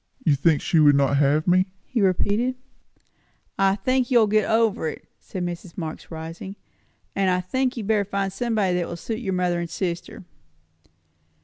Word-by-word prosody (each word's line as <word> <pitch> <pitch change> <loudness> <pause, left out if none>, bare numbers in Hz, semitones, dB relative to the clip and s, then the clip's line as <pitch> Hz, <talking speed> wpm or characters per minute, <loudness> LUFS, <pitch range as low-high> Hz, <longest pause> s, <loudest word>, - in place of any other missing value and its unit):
"You 155 - +4
think 150 +2 +2
she 165 - +2
would 145 -2 +6
not 140 0 +2
have 145 +3 +2
me?" 185 +2 +4 0.2
he 240 - -1
repeated. 205 +6 +1 1.0
"I 195 0 +4
think 255 +5 0
you 250 - +4
will 225 - +6
get 215 +1 +1
over 220 -7 +2
it," - - -7
said 180 -2 -5
Mrs. 175 0 -7
Marx, 160 -3 -6
rising. 165 +4 -7 0.6
"And 195 -1 +2
I 180 0 +2
think 255 +8 -1
you 230 - -3
had - - -7
better 210 -2 +2
find 195 -1 -2
somebody 215 -5 0
that 175 - -1
will 170 - -6
suit 220 +5 -4
your 195 -6 -3
mother 180 -1 0
and 170 -1 -4
sister." 180 +4 -4
190 Hz, 185 wpm, -24 LUFS, 170-215 Hz, 1.0 s, would